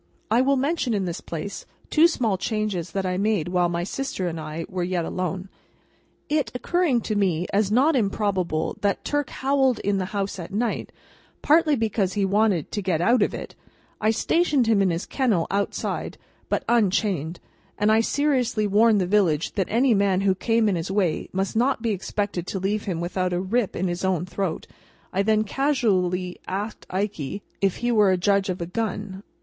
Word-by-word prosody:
I 235 +3 +5
will 275 +1 +3
mention, 275 -3 0
in 195 -2 0
this 175 -1 -4
place, 170 +5 -6 0.3
two 320 +2 +6
small 235 - 0
changes 205 -3 -2
that 195 -1 -1
I 180 0 -1
made 200 -4 0
while 180 -1 +2
my 170 0 -2
sister 200 -2 -3
and 165 -1 -4
I 155 +1 -5
were 185 -1 -4
yet 175 -1 -1
alone. 185 +1 -3 0.8
It 295 -5 0
occurring 305 -2 +1
to 215 - -2
me 180 -4 +1
as 205 0 +2
not 275 +7 +4
improbable 195 -7 0
that 200 -1 0
Turk 290 -2 -1
howled 270 -2 +1
in 200 -1 0
the 185 - -1
house 195 0 -3
at 170 +2 -7
night, 225 +3 -2 0.5
partly 310 0 +4
because 215 -5 0
he 205 -2 +1
wanted 200 -4 +1
to 210 - -2
get 185 -4 0
out 235 +7 +3
of - - +1
it, - - -7 0.5
I 215 - +3
stationed 290 +3 +2
him 220 -3 +3
in 195 - +3
his 170 +1 -2
kennel 225 -11 +1
outside, 200 0 -2 0.3
but - - -1
unchained; 190 -7 +1 0.4
and 210 +1 +3
I 220 +1 +5
seriously 255 -5 +1
warned 210 +1 +4
the - - +1
village 180 -6 +2
that 190 -3 0
any 240 +3 +3
man 195 -2 +2
who 195 -1 +3
came 225 +3 +1
in 200 - +2
his 165 - -4
way 190 -5 0
must 190 +2 -2
not 245 0 +1
expect 205 -3 -2
to 190 +2 -4
leave 205 +3 -1
him 175 -4 -2
without 180 +1 -1
a 175 - 0
rip 205 +3 0
in 185 - -1
his 175 +1 -3
own 185 -3 0
throat. 185 -2 -3 0.5
I 190 - +2
then 215 +1 +2
casually 190 -9 0
asked 205 +4 -4
Ikey 195 -3 -3 0.2
if 195 -2 +1
he 240 - +2
were 210 -4 +4
a 185 - +3
judge 195 +1 +2
of 185 - -2
a - - -1
gun? 205 0 -4
200 Hz, 190 wpm, -24 LUFS, 185-225 Hz, 0.8 s, two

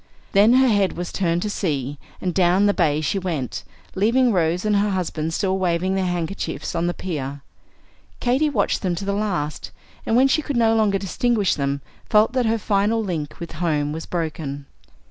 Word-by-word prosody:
Then 210 +4 +5
her 260 +1 +5
head 205 -5 +2
was 175 0 -5
turned 175 -2 0
to 210 - -2
sea, 145 -8 -2 0.2
and 180 -2 -2
down 185 +2 +3
the 205 - +4
bay 150 -4 +1
she 195 +5 0
went, 165 -9 -3 0.3
leaving 235 +6 +3
Rose 175 +1 +1
and 210 -1 +3
her 205 +1 +2
husband 165 -4 -2
still 190 +2 0
waving 180 +1 0
their 190 -1 0
handkerchiefs 175 +2 -3
on 170 0 0
the 175 - 0
pier. 145 -6 -4 0.8
Katy 265 +5 +2
watched 285 - 0
them 180 -3 0
to 195 - -5
the 200 - 0
last, 180 -8 -2 0.3
and 225 - 0
when 260 +2 +6
she 290 +3 +2
could 285 -4 -3
no 225 -1 +4
longer 215 -3 +2
distinguish 205 +1 +1
them, 140 0 -2 0.3
felt 215 +2 +4
that 255 -3 +1
her 225 +1 +2
final 210 +2 +1
link 160 -7 -4
with 170 - -7
home 150 -4 0
was 160 +2 -6
broken. 155 -4 -4
185 Hz, 190 wpm, -22 LUFS, 165-210 Hz, 0.8 s, when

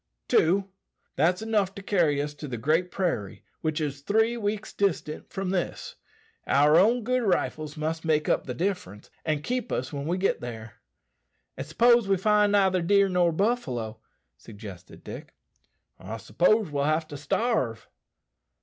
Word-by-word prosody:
"Two. 190 +4 +3 0.5
That's 175 +7 +2
'nough 205 -4 0
to 200 - -8
carry 170 -8 +2
us 145 0 -5
to 145 0 -8
the 125 -3 -4
Great 155 +9 +1
Prairie, 170 - -2 0.2
which 155 0 -1
is 145 -2 -3
three 220 +8 +2
weeks 215 -2 -3
distant 180 -6 -1
from 190 -1 -3
this. 185 -2 -3 0.5
Our 150 +3 +5
own 230 +5 +3
good 255 +2 +1
rifles 155 -7 -1
must 160 +1 -2
make 155 -2 +1
up - - +1
the 125 - -4
difference, 170 - -4
and 155 -2 -1
keep 250 0 -2
us 125 +3 -2
when 140 +1 -4
we 175 +2 0
get 195 +1 0
there." 115 -2 -8 0.8
"And 130 +2 -6
s'pose 235 +6 +4
we 195 - +3
neither 205 -1 +3
find 170 - -3
deer 200 0 +4
nor 180 -2 +3
buffalo," 135 - -1 0.4
suggested 100 -5 -11
Dick. - - -9 0.6
"I 105 +4 -6
s'pose 190 - +2
we'll 140 -1 0
have 155 +1 +1
to 145 - -7
starve." 135 - -1
170 Hz, 160 wpm, -27 LUFS, 145-200 Hz, 0.8 s, Our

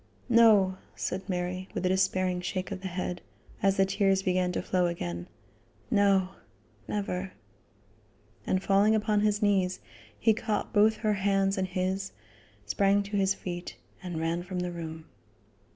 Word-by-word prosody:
"No," 215 -5 +5 0.2
said 190 +2 -4
Mary, 180 +1 -3
with 185 - -2
a - - +3
despairing 185 -1 +1
shake 185 +2 -3
of 190 -2 -5
the 190 - -4
head, 180 -1 -4 0.4
as 195 0 +2
the 195 - +5
tears 195 0 +1
began 180 -1 +1
to - - -1
flow 180 -1 +1
again; 85 - -4 0.6
"no! 195 -2 +3 0.6
never." 195 -2 -3 1.1
And 185 0 +1
falling 200 +3 +4
upon 210 -1 +1
his 210 0 +1
knees, 190 -3 +2 0.4
he 225 - +4
caught 215 -1 -2
both 215 +1 +5
her 215 -1 +1
hands 195 0 +1
in 190 -2 0
his, 190 +1 -2 0.5
sprang 200 - +2
to 205 +1 -6
his 195 -1 +2
feet 175 -1 -6 0.3
and 175 -3 -5
ran 165 +2 -1
from 180 0 -4
the 180 0 -3
room. 160 -2 -7
190 Hz, 150 wpm, -28 LUFS, 180-200 Hz, 1.1 s, No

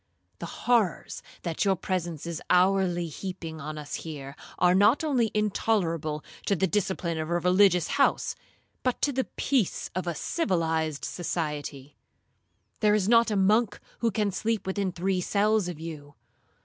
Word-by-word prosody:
The - - -5 0.2
horrors 235 -7 +1 0.2
that 170 -3 -1
your 195 -2 +3
presence 175 -4 -3
is 170 -1 -4
hourly 180 -1 +3
heaping 165 -1 -6
on 155 +2 -6
us 150 -1 -7
here, 140 -4 -7 0.2
are 180 0 +4
not 205 +10 +4
only 255 -7 +2
intolerable 175 -7 0 0.2
to 200 - +3
the 190 - +2
discipline 185 -4 -1
of 155 0 -3
a 175 - +2
religious 180 0 +4
house, 280 - +1 0.5
but 255 -1 0
to 290 - +3
the 260 -1 -1
peace 255 -9 -1
of 185 0 -3
civilized 160 - -1
society. 150 -5 -4 0.8
There 210 -1 +4
is 200 -3 +1
not 230 0 +5
a 210 - 0
monk 210 +3 +3 0.2
who 230 - +2
can 210 -1 0
sleep 220 +3 -1
within 190 0 -1
three 180 +1 -1
cells 210 +1 +2
of 175 -4 -6
you. 150 -3 -8
185 Hz, 150 wpm, -27 LUFS, 165-210 Hz, 0.8 s, not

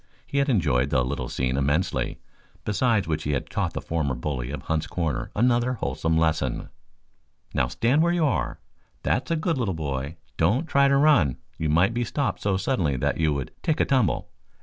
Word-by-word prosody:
He 140 - -1
had 140 +1 +2
enjoyed 70 - +2
the 65 -4 +2
little 65 - -3
scene 65 0 -1
immensely, 70 +7 0 0.5
besides 105 -3 +1
which 80 -1 -1
he 75 -1 -1
had 70 - -3
taught - - -1
the - - -3
former 75 -5 -1
bully 60 -1 -3
of 70 -1 -5
Hunt's 80 0 -1
Corners 85 -4 -2
another 120 +2 +2
wholesome 80 -8 -1
lesson. 80 0 0 0.8
"Now 65 - +2
stand 120 - +2
where 170 +1 +3
you 175 -2 +2
are, 65 - -1 0.4
that's 125 - 0
a 165 - +2
good 160 -2 0
little 100 -7 0
boy. 70 0 -4 0.2
Don't 105 - +2
try 140 -3 +4
to 140 0 +4
run. 135 - +4 0.2
You 80 - 0
might 85 +8 +3
be 120 +1 0
stopped 120 -3 -2
so 100 -2 +1
suddenly 95 - 0
that - - 0
you 80 -2 +3
would 70 -2 -4
take 155 - 0
a - - +4
tumble. 130 -6 +1
85 Hz, 195 wpm, -25 LUFS, -, 0.8 s, try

